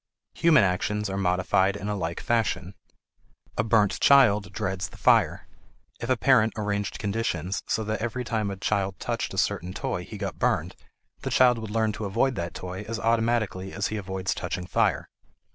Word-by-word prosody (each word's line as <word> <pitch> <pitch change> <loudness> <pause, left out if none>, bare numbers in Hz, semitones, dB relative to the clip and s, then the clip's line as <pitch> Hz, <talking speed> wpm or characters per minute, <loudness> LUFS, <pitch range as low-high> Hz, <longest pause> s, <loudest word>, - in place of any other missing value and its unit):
Human 160 -8 +5
actions 100 +2 -1
are 95 - -3
modified 95 +1 +2
in 100 0 -5
a 105 - -1
like 85 -3 -3
fashion. 110 -5 0 0.8
A - - +1
burnt 110 -3 +2
child 105 -7 +5
dreads 95 -1 -3
the - - -14
fire; - - +3 0.5
if - - -5
a 130 - +3
parent 110 0 +4
arranged 105 -1 -2
conditions 100 -4 -2
so 110 - 0
that 110 +1 -3
every 120 +2 -2
time 110 -4 -1
a 100 - -5
child 100 -1 -1
touched - - -3
a - - -8
certain 90 +2 -1
toy - - -3
he - - -9
got - - -5
burned, - - 0 0.5
the - - -3
child 125 -2 +4
would 110 -1 -6
learn 110 0 +1
to 105 0 -5
avoid 125 +7 +1
that 85 -5 -5
toy 90 +1 -6
as 115 0 -3
automatically 115 -5 0
as 100 - -1
he 110 - -3
avoids 95 -2 -3
touching 90 - -4
fire. 90 - +1
105 Hz, 180 wpm, -26 LUFS, 95-115 Hz, 0.8 s, Human